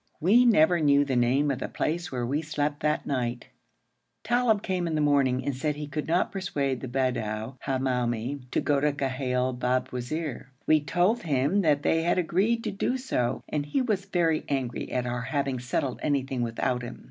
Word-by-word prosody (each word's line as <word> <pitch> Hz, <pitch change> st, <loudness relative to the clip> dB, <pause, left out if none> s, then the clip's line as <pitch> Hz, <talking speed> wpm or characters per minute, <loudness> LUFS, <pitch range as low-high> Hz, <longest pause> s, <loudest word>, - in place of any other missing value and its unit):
We 220 Hz, +10 st, +5 dB
never 175 Hz, -6 st, +5 dB
knew 145 Hz, -2 st, +4 dB
the 135 Hz, -2 st, -1 dB
name 130 Hz, +4 st, +2 dB
of 135 Hz, -, -3 dB
the -, -, -3 dB
place 170 Hz, +3 st, -2 dB
where 125 Hz, -2 st, -2 dB
we 140 Hz, +5 st, -1 dB
slept 150 Hz, -1 st, -2 dB
that 150 Hz, +2 st, 0 dB
night. 125 Hz, -3 st, -2 dB, 0.7 s
Talib 240 Hz, -4 st, +2 dB
came 185 Hz, -3 st, -1 dB
in 160 Hz, -, -1 dB
the -, -, +1 dB
morning 135 Hz, -3 st, +2 dB
and 140 Hz, -2 st, -1 dB
said 150 Hz, +3 st, -1 dB
he 150 Hz, 0 st, -5 dB
could 145 Hz, +1 st, -4 dB
not 170 Hz, +3 st, +1 dB
persuade 140 Hz, -10 st, -2 dB
the -, -, -5 dB
Bedou 120 Hz, -2 st, -2 dB
Hamoumi 125 Hz, -1 st, -1 dB
to -, -, 0 dB
go 145 Hz, -1 st, +2 dB
to 150 Hz, +1 st, +2 dB
Ghail 130 Hz, -2 st, -1 dB
Babwazir. 125 Hz, +3 st, -2 dB, 0.2 s
We 155 Hz, -1 st, +4 dB
told 175 Hz, +10 st, +1 dB
him 150 Hz, +5 st, +1 dB
that 150 Hz, -5 st, +2 dB
they 165 Hz, -, +2 dB
had 170 Hz, +2 st, +1 dB
agreed 195 Hz, +7 st, +1 dB
to -, -, -2 dB
do 250 Hz, +6 st, -1 dB
so, 185 Hz, -, -1 dB
and 150 Hz, -1 st, -1 dB
he 255 Hz, -, 0 dB
was 205 Hz, -6 st, -1 dB
very 170 Hz, -5 st, +1 dB
angry 130 Hz, -4 st, -2 dB
at 125 Hz, -1 st, -1 dB
our 120 Hz, 0 st, -2 dB
having 135 Hz, 0 st, -1 dB
settled 125 Hz, +1 st, -2 dB
anything 135 Hz, -3 st, -1 dB
without 120 Hz, +1 st, -1 dB
him. 120 Hz, 0 st, -7 dB
145 Hz, 190 wpm, -27 LUFS, 125-165 Hz, 0.7 s, We